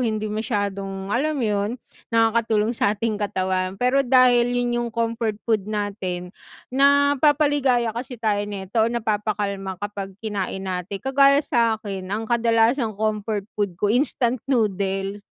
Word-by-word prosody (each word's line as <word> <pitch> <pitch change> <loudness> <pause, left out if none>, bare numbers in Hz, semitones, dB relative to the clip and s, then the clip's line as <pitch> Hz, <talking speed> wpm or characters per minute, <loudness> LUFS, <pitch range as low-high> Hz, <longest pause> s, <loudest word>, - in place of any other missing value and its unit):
hindi 215 -3 -1
masyadong, 200 -3 -3
alam 300 +5 0
yun, 210 +2 -1 0.3
nakakatulong 225 -1 +2
sa 210 -2 0
ating 215 -1 -2
katawan 185 -2 -1
pero 250 +5 +2
dahil 250 -2 +4
'yun 245 -1 0
yung 240 - -2
comfort 230 -1 -2
food 215 -3 0
natin 195 -4 -3 0.4
napapaligaya 285 -3 +3
kasi 245 +3 -6
tayo 215 -3 0
nito 200 +2 -2
o 220 - +3
napapakalma 205 -4 -2
kapag 200 -1 -6
kinain 195 -2 -3
natin, 185 +1 -4
kagaya 275 +2 +4
sa'kin 220 -7 -1
ang 215 +3 -2
kadalasang 230 0 +2
comfort 215 -1 -1
food 200 -4 -2
ko 205 +3 +1
instant 245 -1 +1
noodles, 195 -4 0
220 Hz, 130 wpm, -23 LUFS, 200-240 Hz, 0.4 s, dahil